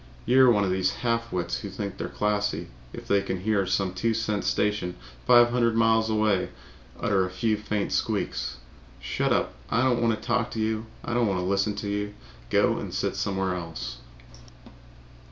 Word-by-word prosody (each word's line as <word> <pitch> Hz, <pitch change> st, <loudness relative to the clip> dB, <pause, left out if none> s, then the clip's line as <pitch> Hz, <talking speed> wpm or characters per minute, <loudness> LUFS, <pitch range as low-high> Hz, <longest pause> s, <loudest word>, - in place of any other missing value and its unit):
You're 130 Hz, +1 st, +6 dB
one 105 Hz, -4 st, +4 dB
of 95 Hz, -, 0 dB
these 95 Hz, 0 st, +1 dB
half 115 Hz, 0 st, 0 dB
wits 85 Hz, -10 st, -2 dB
that -, -, -7 dB
think 100 Hz, -1 st, -5 dB
they're -, -, -4 dB
classy 105 Hz, 0 st, -1 dB, 0.2 s
if -, -, -9 dB
they 100 Hz, 0 st, +3 dB
can 95 Hz, -2 st, -3 dB
hear 100 Hz, -2 st, +1 dB
some 95 Hz, 0 st, 0 dB
two 110 Hz, +5 st, 0 dB
cent 110 Hz, -2 st, -1 dB
station 105 Hz, -4 st, 0 dB, 0.3 s
five 120 Hz, -1 st, +7 dB
hundred 120 Hz, -2 st, +2 dB
miles 115 Hz, -1 st, +3 dB
away 105 Hz, -3 st, +1 dB, 0.5 s
utter 95 Hz, -2 st, +2 dB
a 90 Hz, -, -2 dB
few 105 Hz, +4 st, 0 dB
faint 105 Hz, -1 st, -2 dB
squeaks. -, -, -1 dB, 0.4 s
Shut -, -, -1 dB
up! -, -, +1 dB, 0.2 s
I 115 Hz, +2 st, +2 dB
don't 125 Hz, -2 st, +2 dB
want 115 Hz, -2 st, +2 dB
to -, -, -12 dB
talk 120 Hz, 0 st, +1 dB
to 115 Hz, -, -3 dB
you. 110 Hz, +1 st, -1 dB, 0.2 s
I -, -, -2 dB
don't 120 Hz, -1 st, +2 dB
want 95 Hz, -2 st, 0 dB
to 90 Hz, -, -2 dB
listen 100 Hz, +2 st, +1 dB
to 105 Hz, -, -4 dB
you. 105 Hz, 0 st, -2 dB, 0.3 s
Go -, -, +3 dB
and -, -, -6 dB
sit -, -, -1 dB
somewhere 95 Hz, -1 st, -1 dB
else." 85 Hz, -8 st, -5 dB
105 Hz, 190 wpm, -26 LUFS, 95-115 Hz, 0.5 s, five